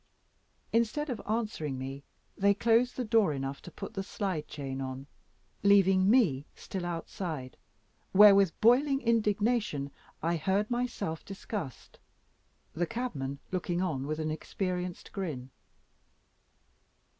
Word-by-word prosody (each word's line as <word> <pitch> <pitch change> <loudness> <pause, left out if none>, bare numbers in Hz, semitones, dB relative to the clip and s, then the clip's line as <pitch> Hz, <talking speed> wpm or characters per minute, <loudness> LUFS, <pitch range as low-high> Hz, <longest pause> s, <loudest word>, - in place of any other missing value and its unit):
Instead 235 +6 +1
of 240 - -4
answering 210 - -2
me, 135 +2 -6 0.3
they 200 +1 +3
closed 235 +3 +3
the 250 - -1
door 215 -7 +3
enough 135 0 -4
to - - -10
put - - -8
the 195 - -2
slide 190 -5 -3
chain 135 -2 -5
on, 130 0 -5 0.6
leaving 195 -1 +5
me 175 - +3
still 185 -2 -5
outside, 165 -5 -5 0.6
where, 205 +1 +9
with 195 -4 +3
boiling 270 +5 +5
indignation, 210 - +1 0.3
I 170 +1 +1
heard 195 +7 0
myself 240 -10 -2
discussed; 195 - -7 0.7
the 175 +1 -1
cabman 140 - -3
looking 175 -1 -1
on 150 -7 -1
with 155 0 -2
an 155 -1 -2
experienced 180 +2 -4
grin. 145 -10 -5
185 Hz, 120 wpm, -30 LUFS, 150-215 Hz, 0.7 s, where